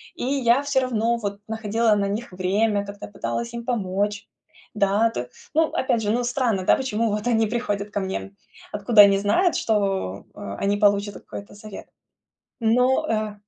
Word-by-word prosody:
и - - -6
я 260 -1 +2
всё 280 -2 +1
равно 235 -2 0
вот 200 -2 -4
находила 220 0 +1
на 200 -1 0
них 210 +2 -4
время, 200 +3 0
как-то 200 0 -8
пыталась 235 +3 -4
им 235 0 -6
помочь. 205 -3 -2 0.5
Да, 210 +2 +2
то 125 - -5 0.3
ну, 320 - +5
опять 235 -3 0
же, 205 - 0
ну, 245 +2 0
странно, 240 -6 0
да, - - +5
почему 230 -4 -1
вот 210 +2 -2
они 225 -2 +2
приходят 205 -3 -2
ко 205 - -2
мне, 190 0 -2
м, 200 0 -12 0.3
откуда 210 +1 +5
они 200 -1 +6
знают, 340 - +2
что, 195 - -1
э, - - -12 0.2
они 200 +1 +1
получат 205 0 +2
какой-то 200 0 -10
совет? 210 -1 -10 0.7
Но 250 +6 +3
э 215 -1 -1
215 Hz, 175 wpm, -23 LUFS, 200-235 Hz, 0.7 s, они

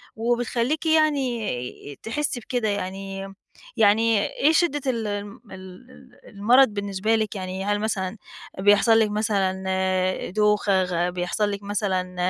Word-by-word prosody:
وبتخلّيكِ 240 +6 -1
يعني 245 - -1
تحسّي 250 +2 -2
بكده، 240 -1 -2
يعني 195 0 -5 0.4
يعني 220 0 +4
إيه 300 +3 +2
شِدّة 315 -3 +1
ال 225 -3 -3
ال 205 0 -5
ال 195 +7 -13
المرَض 240 +7 +4
بالنسبة 200 +1 -1
لِك، 220 -1 -2
يعني 190 0 -5
هل 205 0 0
مثلًا 210 -2 -2 0.4
بيحصَل 205 +3 +4
ِلك 215 -1 +2
مثلًا 195 -3 0 0.7
دوخة 210 -2 +2
غ 175 -1 -1
بيحصَل 180 +4 -1
لِك 200 0 -6
مثلًا 185 -3 -2
205 Hz, 120 wpm, -24 LUFS, 190-235 Hz, 0.7 s, يعني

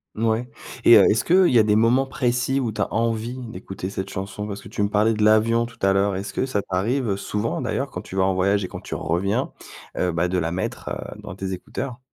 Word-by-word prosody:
Mouais, 115 +2 0 0.4
et - - +9
heu, - - +6
est-ce 115 +3 +2
qu'il 185 +1 +5
y 125 - +5
a 110 - +7
des 105 0 +2
moments 115 +5 +4
précis 125 0 0
où 120 -4 -1
tu 105 - -4
as - - -2
envie 115 +2 -1
d'écouter 95 -4 -6
cette 95 0 -5
chanson, 100 +2 -5
parce 100 -1 -6
que - - -12
tu 105 - -2
me 100 - +1
parlais 105 +2 +3
de 105 - 0
l'avion 115 +2 +4
tout 115 0 -13
à 95 - +4
l'heure, 100 0 +2
est-ce 95 +2 -5
que - - 0
ça 115 -6 -1
t'arrive, 110 +8 -1
heu, 100 - 0
souvent 105 +5 -2
d'ailleurs, 125 +3 -2
quand - - -6
tu - - -10
vas 95 - +2
en 95 0 +2
voyage 100 +2 +2
et - - -3
quand - - -8
tu - - -8
reviens, 90 +6 -1 0.5
heu, 90 - +1
bah, 85 +1 0
de 90 +1 -1
la 85 -1 -1
mettre, 90 +2 -4
heu, - - -6
dans - - -7
tes 95 0 -4
écouteurs? 125 +7 -6
105 Hz, 255 wpm, -23 LUFS, 95-120 Hz, 0.5 s, et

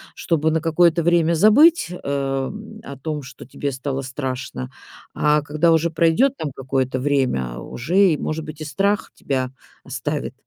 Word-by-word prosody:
чтобы 160 -2 0
на 160 0 0
какое-то 170 +1 +3
время 170 0 +3
забыть, 245 - +5
э, 180 - -6
м, 140 +11 -3
о 140 - -8
том, 150 +2 -4
что 130 0 -11
тебе 140 +2 -4
стало 135 +1 -3
страшно, 130 - -5 0.4
а 150 0 +2
когда 155 +3 +1
уже 165 +1 +2
пройдет 165 - +2
там 150 - -4
какое-то 130 -1 -1
время 125 - 0
уже 155 +10 -3 0.2
и, - - -1
может 155 +1 -4
быть, 155 0 -9
и - - -4
страх 195 +8 0
тебя 130 -2 -2 0.3
оставит. 140 +1 -4
150 Hz, 160 wpm, -21 LUFS, 135-165 Hz, 0.4 s, забыть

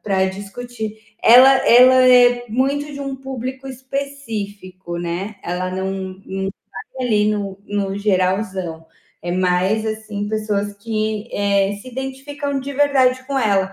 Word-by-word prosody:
pra 190 -2 +1
discutir. 215 +3 -6 0.2
Ela 255 +3 +8
ela 250 +2 +8
é 245 -1 +6
muito 280 +5 -1
de 280 - -7
um 275 -1 -4
público 265 0 -6
específico, 220 -10 -6
né, 175 +5 -4
ela 180 +1 -3
não 190 +1 -2 0.3
não 190 - -6 0.6
vai 255 - -1
ali 210 -2 +2
no 200 -2 -3
no 200 -1 -2
geralzão, 185 -4 -1 0.4
é 175 - -4
mais, 185 +4 +1
assim, 215 -2 -4
pessoas 210 -1 -1
que, 215 0 -3
eh, 200 0 +1
se 255 - -10
identificam 275 +2 -4
de 275 +1 -5
verdade 265 -3 +3
com 275 -1 -1
ela. 195 -4 +1
215 Hz, 135 wpm, -20 LUFS, 195-260 Hz, 0.6 s, Ela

